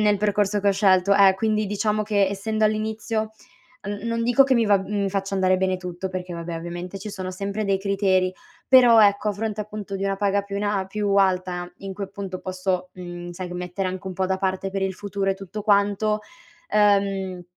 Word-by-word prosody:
nel 210 -1 +3
percorso 205 0 +1
che 200 - +2
ho - - +4
scelto, 195 -1 +4
eh, 195 -1 +6
quindi 215 +1 0
diciamo 210 +1 0
che 205 -2 +2
essendo 215 +3 -1
all'inizio, 215 0 -1 0.5
n 205 +2 -4
non 230 0 -1
dico 245 +4 +5
che 265 -1 +2
mi 235 -2 +3
va 205 -2 +4
mhmm, 200 +1 -3
mi 195 - -1
faccia 195 0 -2
andare 185 -1 +2
bene 185 0 +1
tutto 180 +1 -5
perché, 185 -1 -5
vabbè, 170 0 -5
ovviamente 175 +3 -6
ci 210 +2 -7
sono 185 -2 -5
sempre 200 +3 -3
dei 195 -1 +1
criteri, 195 -2 +1 0.3
però, 245 -3 +7
ecco, 205 +1 0
a - - +1
fronte 215 +1 -3
appunto 210 -1 -6
di 195 - -2
una 195 0 0
paga 200 0 +1
più 200 0 -6
in 205 - -2
a 205 -1 +1
a 190 - -3
più 205 0 -2
alta 180 -2 +1
in 195 -1 -6
cui, 200 +1 -5
appunto, 195 -1 -6
posso, 185 -1 -2
mhmm, 175 -1 -7
sai, 180 +1 -6
gh 175 - -8
mettere 180 +2 -3
anche 185 +1 -6
un 190 - -4
po' 190 +1 0
da 190 0 -1
parte 190 0 -1
per 195 0 -3
il 190 -1 -1
futuro 200 0 -3
e - - 0
tutto 195 +2 -7
quanto, 205 +1 +2 0.5
ehm, 195 -3 +2
195 Hz, 220 wpm, -23 LUFS, 185-210 Hz, 0.5 s, però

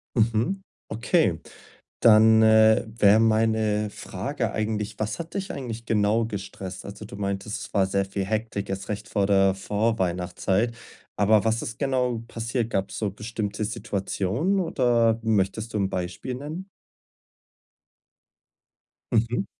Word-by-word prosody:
Mhm, 115 - +1 0.3
okay. 115 - +1 0.6
Dann, 110 0 +7
äh, 110 0 +6
wäre 110 -1 +4
meine 110 -1 +2
Frage - - -4
eigentlich: 105 -1 -2
„Was 110 -1 -2
hat 170 -1 -7
dich 195 -1 -3
eigentlich 120 -4 -6
genau 110 +1 +2
gestresst?“ 95 -3 -7
Also, 100 +2 -8
du 100 - -9
meintest, 100 +2 -3
es - - -10
war 95 -2 +3
sehr 100 +1 0
viel 95 0 -3
Hektik 110 -1 -2
erst 95 0 -4
recht 105 +1 -4
vor 100 -3 +1
der 95 -1 +4
Vorweihnachtszeit, 95 +1 0 0.4
aber 105 0 +4
was 115 +1 +1
ist 115 - -6
genau 125 -4 0
passiert? 115 0 -2
Gab's 95 -2 -2
so 105 -3 -1
bestimmte 105 0 -4
Situationen 105 - -1
oder 120 -8 +2
möchtest 110 +1 0
du - - +1
'n 95 -1 +1
Beispiel 90 +7 -4
nennen? 155 +9 -7 2.4
Mhm. 115 -1 +1
110 Hz, 130 wpm, -25 LUFS, 100-115 Hz, 2.4 s, Dann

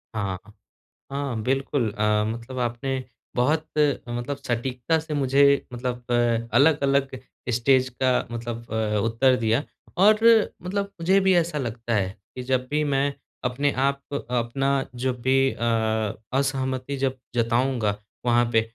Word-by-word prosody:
हाँ। 100 -4 -2 0.7
हाँ, 140 -5 -2
बिल्कुल। 135 -1 0
अ, 105 0 +1
मतलब 115 +3 -5
आपने 130 +2 -2 0.3
बहुत 150 +6 +2 0.4
मतलब 120 +4 -3
सटीकता 125 +3 -1
से 155 -1 -5
मुझे 140 -1 +3 0.3
मतलब 125 0 -4
अ, 120 -1 +1
अलग-अलग 140 -2 +3 0.4
स्टेज 130 +2 +3
का 130 - +4 0.2
मतलब 115 0 -5
अ, 110 -1 0
उत्तर 125 +3 +3
दिया 115 +3 +1 0.4
और 210 +2 +8 0.5
मतलब 200 +2 -2
मुझे 185 +4 +4
भी 190 -1 +4
ऐसा 165 -3 +1
लगता 115 -2 -3
है 95 -3 +1 0.3
कि 125 - -5
जब 130 0 0
भी 150 +1 +1
मैं 140 0 +1 0.3
अपने 140 +3 +1 0.2
आप 140 0 0 0.3
अपना 125 +3 0 0.3
जब 125 -2 -1
भी 135 +1 +3
अ, - - -12 0.8
असहमति 135 0 -1
जब 135 -1 -1 0.2
जताऊँगा 115 -2 +1 0.3
वहाँ 120 0 +4
पे 110 - +5
130 Hz, 135 wpm, -24 LUFS, 115-140 Hz, 0.8 s, और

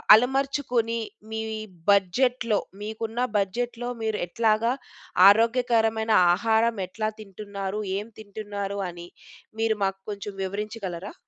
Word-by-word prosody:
అలమర్చుకొని 250 -2 +1 0.3
మీ 220 0 -2 0.5
బడ్జెట్‌లో 225 +3 +2 0.2
మీకున్న 220 +2 -4 0.2
బడ్జెట్‌లో 240 +5 -2
మీరు 220 -1 -1
ఎట్లాగా 225 +4 +2 0.6
ఆరోగ్యకరమైన 225 0 +3 0.2
ఆహారం 225 +3 +2
ఎట్లా 215 +3 -2
తింటున్నారు? 200 0 -5 0.2
ఏం 205 +2 -4
తింటున్నారు? 200 -1 -5
అని 175 0 -9 0.5
మీరు 225 -1 +2
మాకు 195 0 -2
కొంచెం 205 0 -6
వివరించగలరా? 200 -2 -5
220 Hz, 95 wpm, -26 LUFS, 200-230 Hz, 0.6 s, ఆరోగ్యకరమైన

